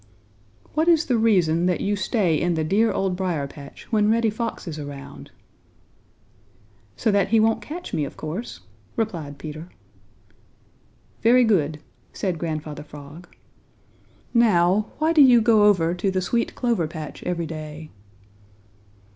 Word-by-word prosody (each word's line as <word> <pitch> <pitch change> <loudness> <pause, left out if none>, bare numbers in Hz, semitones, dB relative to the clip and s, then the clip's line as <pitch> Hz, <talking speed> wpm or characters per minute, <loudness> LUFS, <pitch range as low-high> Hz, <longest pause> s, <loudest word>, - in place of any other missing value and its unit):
"What 315 +2 +1
is 335 -1 +4
the 245 - +1
reason 180 -6 +3
that 180 - +1
you 205 +1 0
stay 190 -3 0
in 170 +3 +1
the 160 - 0
dear 205 +8 +2
Old 190 -1 -1
Briar 175 -6 -2
patch 140 0 -12
when 210 -2 +3
Reddy 225 0 +2
Fox 225 -2 -5
is 155 -2 -5
around?" 140 - -9 1.7
"So 220 - +1
that 200 -1 +2
he 225 +2 +3
won't 225 +1 +2
catch 350 +4 -8
me, 150 - 0
of 140 - -7
course," 170 +10 -6 0.3
replied 160 -10 -3
Peter. 155 +4 -8 1.5
"Very 245 +2 +5
good," 155 -9 +1 0.3
said 180 -5 -2
Grandfather 155 -2 -4
Frog. 150 +3 -12 1.1
"Now, 210 -3 +3
why 315 +2 +1
do 310 - +6
you 250 -3 +7
go 220 -2 +4
over 175 -5 +3
to 185 +2 -1
the 190 0 0
sweet 235 +6 -1
clover 235 -10 0
patch 155 -2 -8
every 170 -2 -2
day?" 155 -1 -8
180 Hz, 145 wpm, -23 LUFS, 155-225 Hz, 1.7 s, you